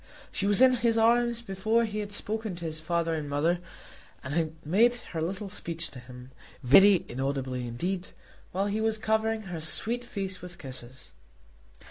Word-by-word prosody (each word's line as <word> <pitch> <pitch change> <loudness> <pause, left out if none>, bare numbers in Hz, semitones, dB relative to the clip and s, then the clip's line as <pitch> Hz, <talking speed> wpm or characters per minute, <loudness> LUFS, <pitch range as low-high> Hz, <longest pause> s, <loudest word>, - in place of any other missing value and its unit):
She 200 - -1
was 205 +4 +6
in 260 0 +7
his 230 -1 +2
arms 235 +1 +3
before 220 +3 +1
he 215 -1 -4
had 205 -1 -4
spoken 215 -1 -3
to 170 0 -7
his 160 -1 0
father 165 +1 -1
and 150 -2 -3
mother, 160 +5 +1 0.6
and 130 +1 -5
had 160 -1 -1
made 225 +10 +4
her 175 -9 -6
little 190 +5 -3
speech 170 -3 -4
to 130 - -10
him, 125 +1 -12 0.3
very 190 +9 +7
inaudibly 130 -1 -3
indeed, 180 +10 -3 0.4
while 195 +2 0
he 205 +2 -1
was 220 0 +1
covering 220 0 0
her 175 -4 -6
sweet 225 +10 +1
face 195 -5 -4
with 180 0 -8
kisses. 130 -3 -10
185 Hz, 170 wpm, -28 LUFS, 155-220 Hz, 0.6 s, in